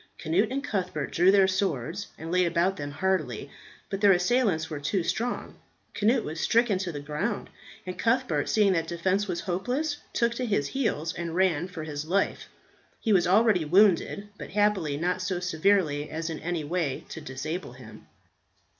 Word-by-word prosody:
Cnut 175 +7 +1
and 275 +1 -2
Cuthbert 180 - -2
drew 175 +2 +4
their 195 -1 +5
swords 185 -2 -1
and 160 +1 -6
laid 180 0 +3
about 175 +3 +1
them 145 -3 -5
heartily, 155 - -1 0.4
but 195 - -4
their 200 -2 +7
assailants 180 -3 +2
were 155 -3 -5
too 155 +6 -1
strong. 240 +7 -3 0.3
Cnut 225 +3 +2
was 160 +2 -5
stricken 230 -2 +2
to 185 -2 -3
the 145 - -5
ground, 150 +9 -3 0.3
and 185 0 -6
Cuthbert, 250 +2 +1
seeing 210 -3 +4
that 165 -2 0
defence 185 +4 0
was 175 -2 -2
hopeless, 250 - -2
took 235 0 +1
to 250 +1 -3
his 145 -10 0
heels 175 - -1
and 170 -1 -4
ran 180 -3 +2
for 180 -4 -7
his 150 -1 -4
life. 190 +5 -1 0.5
He 220 - +1
was 180 -3 +4
already 205 -2 +4
wounded, 195 +4 +3
but - - -7
happily 195 -8 +1
not 180 +3 -1
so 185 -1 -1
severely 160 -4 +1
as 165 +1 -4
in 160 - -5
any 170 -2 -2
way 150 -3 -2
to 160 - -7
disable 150 +2 -5
him. 125 -4 -13
180 Hz, 175 wpm, -27 LUFS, 160-205 Hz, 0.5 s, their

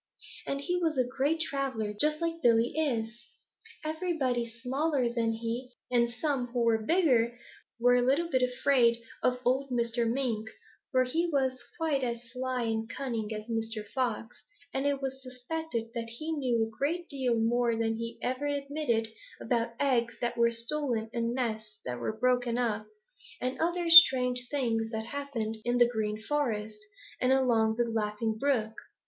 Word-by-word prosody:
And 275 0 -2
he 355 +4 -1
was 325 -4 0
a 255 - +4
great 275 +6 -1
traveler, 265 -9 -2
just 300 +9 +2
as 335 - +1
Billy 235 -2 +3
is. 235 -6 -1 0.6
Everybody 310 -8 -1
smaller 260 +2 -1
than 230 -1 +1
he 235 +3 -4 0.2
and 235 -1 +3
some 255 0 -1
who 240 0 -1
were 225 -1 +2
bigger 245 -7 +2 0.4
were 245 +1 +5
a - - +3
little 275 +7 +2
bit 260 -6 +1
afraid 250 -1 +3 0.2
of 250 0 +2
old 265 +3 +1
Mr. 235 -1 0
Mink, 230 -4 -1 0.4
for 255 -2 +4
he 330 +7 0
was 260 -3 0
quite 310 -5 0
as 235 -1 -2
sly 255 0 -2
and 225 0 -2
cunning 230 -5 -3
as 215 0 -5
Mr. 225 -2 -3
Fox, 235 -2 -3 0.3
and 270 +1 0
it 280 -1 -1
was 265 0 -4
suspected 250 -1 -5
that 230 -1 -4
he 310 +8 -4
knew 255 -7 +1
a 220 0 -11
great 335 +5 -1
deal 260 -4 0
more 235 +1 +1
than 225 0 -1
he 230 0 -5
ever 255 +3 -1
admitted 280 -5 -1 0.3
about 235 -2 -1
eggs 235 -4 +1
that 240 - -1
were 235 0 +4
stolen 235 -1 -1
and 235 0 -1
nests 220 -4 -3
that 125 -1 -4
were 220 - -3
broken 245 0 +1
up, 220 -3 -1 0.5
and 255 +1 -3
other 345 +1 0
strange 250 -6 +8
things 230 -6 0
that 220 -1 -4
happened 235 -5 -4
in 240 0 +1
the 240 -1 +6
Green 215 -2 -2
Forest 220 -5 -2 0.4
and 255 - +3
along 235 -4 +3
the 240 - +2
Laughing 220 -1 -1
Brook. 225 -3 0
245 Hz, 165 wpm, -29 LUFS, 230-275 Hz, 0.6 s, strange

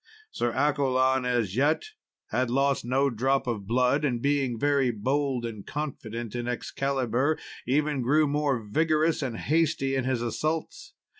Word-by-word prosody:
Sir 120 - -1
Accolon, 130 -2 +2
as 120 -6 0
yet, 145 +5 +2 0.5
had 125 -1 +1
lost 140 +2 +1
no 135 +3 +1
drop 130 +4 +1
of 110 -6 -3
blood, 125 +5 +2
and 125 -5 0
being 135 -2 0
very 140 0 +2
bold 130 +3 -1
and 110 -3 -6
confident 120 -6 -5
in 120 0 -3
Excalibur, 135 +2 -1 0.3
even 145 +1 +1
grew 150 +6 +3
more 145 -2 +1
vigorous 155 +6 +2
and 125 -5 -3
hasty 155 -3 +1
in 135 -1 0
his 130 -2 0
assaults. 155 +7 -3
130 Hz, 145 wpm, -27 LUFS, 120-145 Hz, 0.5 s, grew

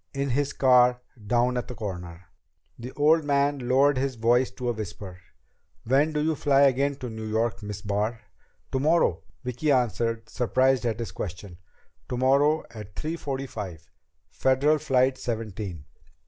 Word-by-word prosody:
In 140 -1 -1
his 140 +2 0
car 125 -2 +4 0.3
down 125 +2 +2
at 125 - -3
the 125 - -7
corner." 90 -5 -7 0.5
The 125 +2 -7
old 155 +2 +3
man 140 -3 0
lowered 135 +1 +4
his 135 -1 -1
voice 120 +3 +2
to 125 -2 -4
a - - +1
whisper. 100 -4 -7 0.6
"When 140 +6 +2
do 150 -1 -1
you 160 +1 +1
fly 140 -1 +2
again 140 +1 +3
to 130 -3 -7
New 110 0 -6
York, 110 +2 -1
Miss 105 -1 -7
Barr?" 105 +3 -1 0.5
"Tomorrow," 155 +6 +2 0.2
Vicki 125 +4 -1
answered, 115 -3 0
surprised 130 0 +1
at 110 -2 -1
this 115 -1 -5
question. 90 -1 -7 0.5
"Tomorrow 140 +5 +2
at 105 -3 -10
three 160 +2 -3
forty 135 -4 -4
five. 95 - -7 0.4
Federal 140 +4 +2
Flight 130 -1 +2
Seventeen." 105 - -5
125 Hz, 150 wpm, -26 LUFS, 110-140 Hz, 0.6 s, car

